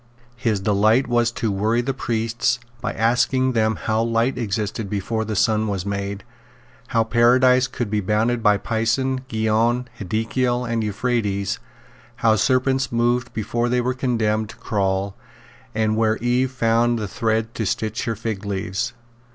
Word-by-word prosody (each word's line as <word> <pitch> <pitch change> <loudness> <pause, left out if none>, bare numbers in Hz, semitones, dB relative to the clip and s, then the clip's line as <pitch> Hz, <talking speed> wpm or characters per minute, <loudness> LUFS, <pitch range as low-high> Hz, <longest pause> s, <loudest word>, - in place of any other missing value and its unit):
His 115 -4 0
delight 110 +6 +3
was 120 -1 +2
to 115 -3 -1
worry 110 +5 +1
the 135 +2 -2
priests 115 -1 0 0.2
by 125 - -2
asking 125 +3 +2
them 110 -2 +1
how 110 0 -1
light 115 +3 +1
existed 105 -2 -3
before 105 +3 -2
the 110 0 -3
sun 110 +2 +2
was 100 -3 -2
made, 100 0 -3 0.6
how 115 - +2
Paradise 125 +2 +4
could 120 -5 -4
be 105 - +1
bounded 110 +4 +1
by 105 -2 +4
Pison, 115 +5 0
Gihon, 115 +2 +1
Hiddekel 120 +5 -1
and 115 -1 -1
Euphrates, 105 -3 -1 0.6
how 110 -1 +3
serpents 130 +4 +1
moved 120 +1 +1
before 120 +2 -1
they 125 +1 +2
were 125 +1 0
condemned 110 -4 0
to - - -10
crawl, 95 -1 -1 0.6
and 110 0 +1
where 110 0 +2
Eve 125 +2 +1
found 115 -2 +1
thread 110 +3 -1
to 110 - -2
stitch 110 +2 -2
her 115 - -1
figleaves. 100 +1 -3
115 Hz, 145 wpm, -22 LUFS, 105-120 Hz, 0.6 s, Paradise